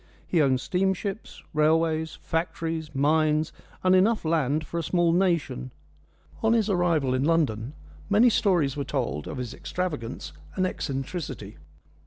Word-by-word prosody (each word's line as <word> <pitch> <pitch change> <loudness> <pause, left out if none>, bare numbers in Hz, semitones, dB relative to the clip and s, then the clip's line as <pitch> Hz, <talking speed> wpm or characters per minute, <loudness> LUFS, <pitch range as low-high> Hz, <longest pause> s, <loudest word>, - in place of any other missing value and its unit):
He 170 - +2
owned 130 -3 +3
steamships, 190 - -2
railways, 160 +1 +2
factories, 165 -2 -2
mines, 155 +2 +2 0.3
and 185 0 +4
enough 210 +1 +3
land 155 -1 +1
for 170 - -3
a - - 0
small 170 +1 +2
nation. 170 - +1 0.7
On 225 0 +3
his 220 -3 +2
arrival 165 -8 +2
in 130 +1 +1
London 140 -7 +1 0.4
many 225 +4 +5
stories 175 - +2
were 145 - -2
told 70 - -2
of - - -5
his 125 -3 -4
extravagance 150 -10 -4 0.2
and 185 - +1
eccentricity. 135 - -4
160 Hz, 135 wpm, -26 LUFS, 140-180 Hz, 0.7 s, many